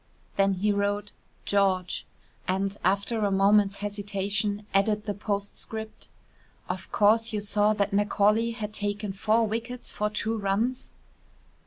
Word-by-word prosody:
Then 195 0 +3
he 205 +3 +1
wrote 205 0 -1 0.3
"George" 190 -3 +1 0.4
and, 195 +1 0
after 200 +5 +1
a 205 - +2
moment's 200 +1 +4
hesitation, 205 0 -2
added 210 +2 +2
the 205 - -1
postscript: 210 +2 -5 0.6
"Of - - -5
course 220 +2 +4
you 215 - -1
saw 205 +1 +2
that 200 -1 -1
Macaulay 210 +2 +3
had 215 -2 -5
taken 205 -1 -2
four 220 +4 +2
wickets 230 +3 -3
for 210 0 -1
two 220 +1 -1
runs?" 215 +6 -1
205 Hz, 130 wpm, -27 LUFS, 200-215 Hz, 0.6 s, moment's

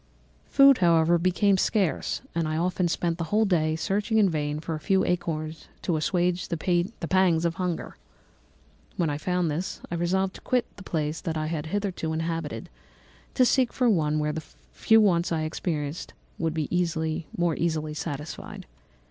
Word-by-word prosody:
"Food, 275 -1 +6
however, 170 -1 +4
became 185 +2 +2
scarce, 190 - 0
and 165 -2 0
I 155 0 -1
often 180 +1 +1
spent 170 0 -1
the 165 - -1
whole 215 +6 +2
day 160 -5 +1
searching 205 +6 0
in 200 -4 +4
vain 150 -1 -2
for 165 +1 -4
a 155 - -3
few 190 +5 +2
acorns 160 -3 -2 0.2
to 175 - 0
assuage 175 +4 0
the 170 - -2
pangs 175 -1 +1
of 170 - +1
hunger. 180 -2 -3 1.0
When 165 -4 +1
I 145 - -3
found 180 0 0
this, 170 +6 -3
I - - -2
resolved 185 +3 0
to - - -12
quit 250 -2 +1
the - - -11
place 155 -4 -2
that 160 -2 -3
I 155 - -1
had 155 -1 -3
hitherto 185 -4 -2
inhabited, 165 -7 -3 0.7
to 255 - +5
seek 255 -1 +3
for 250 -3 +2
one 155 -5 +1
where 150 0 0
the 160 - -4 0.3
few 225 0 +4
wants 175 -5 +3
I 160 -1 0
experienced 155 -1 -3 0.2
would 165 -1 -1
be 160 0 -1
more 170 -3 +1
easily 155 -2 -1
satisfied. 150 -1 -6
170 Hz, 170 wpm, -26 LUFS, 155-185 Hz, 1.0 s, Food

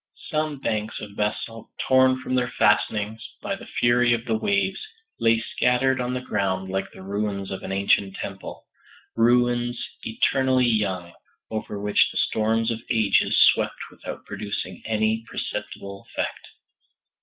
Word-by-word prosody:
Some 155 -1 0
banks 110 -4 -2
of 100 - -9
basalt, 110 +2 -3 0.2
torn 130 0 +4
from 130 - -3
their 125 -1 +2
fastenings 105 +1 +2 0.2
by 200 -1 -3
the - - -11
fury 120 0 +3
of 115 0 -2
the 115 - 0
waves, 110 - 0 0.4
lay 115 0 +4
scattered 125 +3 +1
on 125 +1 -2
the 125 - -2
ground 95 -5 -1
like 95 0 -2
the - - -12
ruins 100 0 -3
of 95 - -4
an - - -6
ancient 100 0 +2
temple 95 -1 -7 0.5
ruins 120 +1 +3 0.2
eternally 130 +3 +2
young, 95 -7 0 0.4
over 110 -2 -4
which 105 0 +3
the - - -6
storms 110 +1 +2
of 115 - -4
ages 110 -4 +3
swept - - -3
without - - -8
producing 100 -1 -4
any 110 0 +1
perceptible 100 0 -5
effect! - - -4
110 Hz, 145 wpm, -24 LUFS, 100-125 Hz, 0.5 s, torn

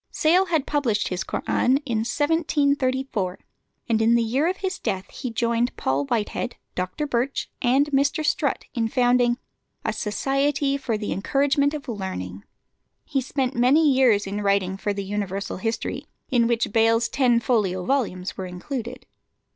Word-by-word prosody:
Sale 355 +5 +3
had 320 -5 +1
published 245 -8 0
his 185 0 -2
Koran 255 +6 +1
in 235 -5 0
1734, 270 - 0 0.5
and 225 -2 +2
in 230 +1 +4
the 235 - +3
year 260 +8 +1
of 370 +2 -1
his 380 -2 -3
death 190 -1 -2
he 255 - -5
joined 235 +1 0
Paul 135 +2 0
Whitehead, 230 - -2 0.2
Dr. 185 +12 -3
Birch, 265 0 -1
and 265 +3 +3
Mr. 285 +3 +1
Strutt, - - 0
in 230 -4 0
founding 245 0 +3 0.5
a - - 0
"Society 275 +5 0
for 250 -5 -2
the 210 -1 -4
Encouragement 280 +7 +1
of 295 -1 -7
Learning." 145 - -5 0.6
He 275 -3 0
spent 265 0 -1
many 275 +6 +4
years 245 -6 +4
in 200 +2 -3
writing 200 -2 +1
for 205 +1 -2
the 200 0 -3
Universal 200 0 -3
History, 225 +4 -3 0.2
in 235 -2 +3
which 230 -3 0
Bayle's 230 +1 +3
ten 250 -4 +3
folio 205 -6 0
volumes 205 -9 -1
were 190 - -5
included. 240 +7 -6
240 Hz, 155 wpm, -24 LUFS, 205-275 Hz, 0.6 s, in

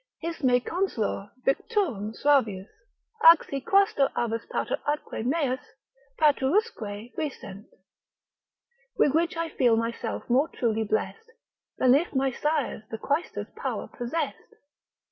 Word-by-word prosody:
His 335 +1 -5
me 250 -1 +4
consolor 245 - -2 0.2
victurum 270 - 0
suavius, 220 -10 +2 0.6
ac 335 - +2
si 275 -1 -4
Quaestor 390 -6 +3
avus 230 -1 -1
pater - - -2
atque 295 -6 -2
meus, 260 -1 0 0.6
patruusque 265 - +1
fuissent. 210 -10 -6 1.3
With 285 - +4
which 330 +1 +1
I 330 0 -1
feel 240 -6 +3
myself 230 0 -3
more 260 +5 +3
truly 225 -7 -1
blest 445 - -2 0.5
Than 255 -1 +5
if 295 +2 +1
my 265 0 +2
sires 295 -2 -1
the 225 - -5
quaestor's 290 +9 -2
power - - -4
possess'd. 320 - -4
270 Hz, 120 wpm, -27 LUFS, 230-320 Hz, 1.3 s, Than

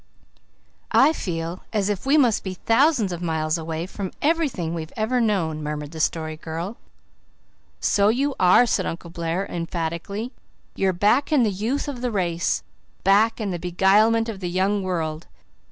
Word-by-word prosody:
"I 315 - +5
feel 170 - -4
as 205 -3 0
if 205 +4 -2
we 290 +3 +5
must 245 -7 +3
be 190 -1 -4
thousands 230 - +2
of 175 -1 -5
miles 160 -1 -1
away 160 +1 -4
from 190 0 -6
everything 285 - 0
we've 160 -2 -5
ever 235 +3 +1
known," 175 -9 0
murmured 150 -1 -4
the 160 - -8
Story 155 0 -1
Girl. 170 +7 -5 1.0
"So 205 0 +3
you 275 +5 +1
are!" 185 +7 +6
said 205 -5 0
Uncle 170 0 -6
Blair 170 +2 -2
emphatically. 170 +7 -4 0.4
"You're 195 -1 +1
back 210 - +2
in 285 -5 +4
the 215 - +2
youth 225 +10 -2
of 265 -4 -5
the 250 - 0
race 175 -5 -1 0.4
back 210 +5 +4
in 210 -3 -2
the 175 - -3
beguilement 205 +6 +3
of 220 -4 -5
the 180 -2 -3
young 190 +3 +1
world. 165 -4 -3
190 Hz, 165 wpm, -23 LUFS, 165-225 Hz, 1.0 s, are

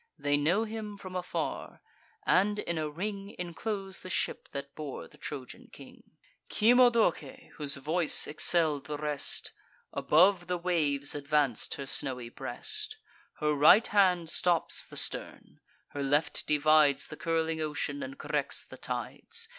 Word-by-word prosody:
They 145 0 +1
know 165 +9 +2
him 215 -2 -6
from 185 -2 -9
afar; 180 0 -4 0.5
and 205 +3 +3
in 170 -5 -2
a 155 -1 -2
ring 200 +5 -5
Enclose 190 +2 -5
the 185 - -9
ship 175 - -2
that 140 0 -6
bore 150 -4 -7
the - - -20
Trojan 135 -4 -8
king. - - -15 0.3
Cymodoce, 245 +2 +3
whose 145 -2 +1
voice 155 +4 +3
excell'd 155 -1 +3
the 150 -1 -4
rest, 150 -1 -2 0.4
Above 175 +3 +4
the 180 0 -1
waves 155 -6 +1
advanc'd 145 -4 0
her 140 - -6
snowy 130 -3 -2
breast; 430 - -6 0.4
Her 150 -1 0
right 150 +10 +7
hand 180 -5 +2
stops 175 -2 +1
the - - -9
stern; - - -5 0.3
her 145 - -5
left 145 +2 +1
divides 150 -1 +4
The 150 - -7
curling 160 0 -1
ocean, 155 - -3
and 280 0 -6
corrects - - -2
the - - -12
tides. 465 0 -5
165 Hz, 140 wpm, -30 LUFS, 145-200 Hz, 0.5 s, right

